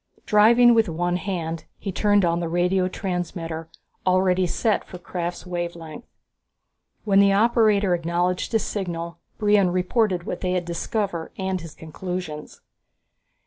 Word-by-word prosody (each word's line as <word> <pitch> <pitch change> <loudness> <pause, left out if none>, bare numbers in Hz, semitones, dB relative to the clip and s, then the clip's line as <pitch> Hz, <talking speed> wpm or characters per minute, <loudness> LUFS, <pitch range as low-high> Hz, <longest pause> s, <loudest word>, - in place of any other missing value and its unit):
Driving 235 +3 +6
with 225 -4 +3
one 175 +2 -1
hand, 165 -3 -4
he 195 - -5
turned 205 0 +3
on 170 0 +1
the 170 -1 -3
radio 180 +2 +1
transmitter, 170 -4 -4 0.3
already 185 0 +2
set 215 +5 0
for 180 - -10
Krafft's 175 0 -5
wave 175 -1 -3
length. 165 +6 -10 1.0
When 200 -2 +3
the 200 0 +5
operator 210 -3 +3
acknowledged 175 +2 -1
his 225 -2 +1
signal 170 -4 -4 0.2
Brion 205 -3 +3
reported 185 +1 +1
what 180 - -5
they 180 -1 -1
had 180 -1 -1
discovered 170 0 -3
and 190 -1 -2
his 165 -2 -10
conclusions. 160 -1 -6
180 Hz, 140 wpm, -23 LUFS, 170-200 Hz, 1.0 s, Driving